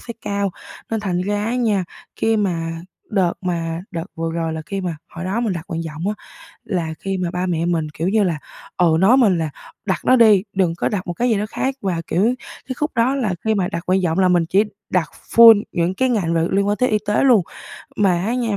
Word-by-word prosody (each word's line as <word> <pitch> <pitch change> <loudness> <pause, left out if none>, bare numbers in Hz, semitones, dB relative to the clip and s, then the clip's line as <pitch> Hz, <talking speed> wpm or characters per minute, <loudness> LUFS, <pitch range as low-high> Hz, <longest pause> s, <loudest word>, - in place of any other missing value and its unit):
sẽ 235 - -8
cao. 200 -1 -1 0.4
Nên 225 -1 -1
thành 185 -4 -1
ra 205 +2 -1
á 230 +3 -1
nha, 215 -7 +1 0.3
khi 225 0 +1
mà 165 -5 -2 0.3
đợt 190 -5 +2
mà 170 -2 -2
đợt 165 -1 -4
vừa 165 0 -3
rồi 165 -1 -2
là 160 0 -5
khi 195 +3 -3
mà 175 -4 -3
hồi 170 - -7
đó 195 +5 -1
mình 230 -4 0
đặt 170 -3 -5
nguyện 165 -3 -3
vọng 160 +4 -4
á, 210 - -1 0.5
là 170 -5 -2
khi 195 0 -3
mà 180 -2 -2
ba 180 0 -2
mẹ 170 -2 -1
mình, 165 -3 0
kiểu 160 +3 -3
như 215 0 +3
là, 170 -5 0 0.4
ừ, 170 -3 +4
nói 210 +8 +5
mình 210 -9 +4
là 160 -2 -1 0.4
"Đặt 190 -3 -2
nó 255 - +6
đi, 215 -6 +6
đừng 180 -4 +1
có - - -1
đặt 195 -3 -3
một 175 - -2
cái 245 +7 0
gì 220 - +2
đó 205 - -1
khác" 265 +3 -2
và, 180 -4 -1
kiểu, 180 - +1 0.4
cái 260 - -3
khúc 300 0 -1
đó 245 +3 +2
là 230 -9 0
khi 220 0 +2
mà 190 -3 0
đặt 170 - -4
nguyện 185 +1 +2
vọng 165 +2 0
là 185 - +4
mình 175 -2 +3
chỉ 190 +5 +3 0.3
đặt 170 -5 0 0.3
full 225 -3 +9
những 175 +1 0
cái 260 +6 +1
ngành 190 -8 0
v - - +2 0.2
liên 200 +1 +2
quan 205 0 +1
tới 255 - +2
y 215 - +2
tế 210 - +2
luôn. 245 -7 +6 0.6
Mà 180 -3 +2
á 235 - 0
nha, 230 -5 -1
190 Hz, 250 wpm, -20 LUFS, 170-215 Hz, 0.6 s, full